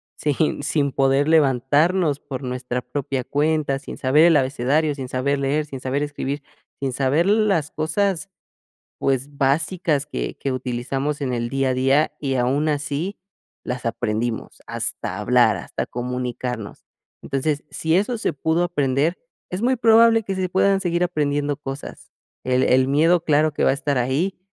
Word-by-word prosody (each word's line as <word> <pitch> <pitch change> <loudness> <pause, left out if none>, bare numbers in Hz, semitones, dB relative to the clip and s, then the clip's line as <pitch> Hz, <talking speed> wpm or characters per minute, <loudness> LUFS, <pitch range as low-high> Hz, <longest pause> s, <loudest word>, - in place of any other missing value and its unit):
sin 150 0 0
sin 140 -1 0
poder 135 +1 +2
levantarnos 150 +2 +3
por 135 -1 -7
nuestra 125 0 -3
propia 130 0 -3
cuenta, 145 -1 0
sin - - -9
saber 145 +5 +4
el 165 -3 +6
abecedario, 140 +3 +1
sin 130 -3 -6
saber 140 +2 0
leer, 140 +3 0
sin 135 -3 -8
saber 135 +3 -1
escribir, 145 -1 -4 0.4
sin 135 -2 -2
saber 140 +5 +2
las 200 -7 +2
cosas, 185 +4 -1 0.7
pues 135 +2 -1
básicas 150 +1 +1
que - - -4
que 135 - -3
utilizamos 130 +3 -2
en 130 -3 -2
el 120 -1 -2
día 135 +1 0
a 130 - +1
día, 135 +4 +2
y 135 -2 -2
aun 135 +5 +1
así 145 +6 -2 0.5
las 125 -1 -4
aprendimos, 115 0 -2
hasta - - -3
hablar, - - +3
hasta - - -5
comunicarnos, 125 -2 -4 0.4
entonces, 145 +2 -1
si 160 +1 -1
eso 225 +4 0
se - - -1
pudo 160 +4 0
aprender, 145 0 0 0.3
es 185 +4 -4
muy 255 +2 +2
probable 225 -1 +5
que 195 - -3
se 185 -1 -1
puedan 195 +1 +2
seguir 175 -1 0
aprendiendo 145 -3 -1
cosas. 140 -1 -8 0.3
El 130 0 +2
el 130 +1 +3
miedo 165 +5 +3
claro 155 -1 +2
que - - -2
va - - +4
a - - +3
estar 140 0 -2
ahí, 140 +11 0
145 Hz, 160 wpm, -22 LUFS, 130-160 Hz, 0.7 s, el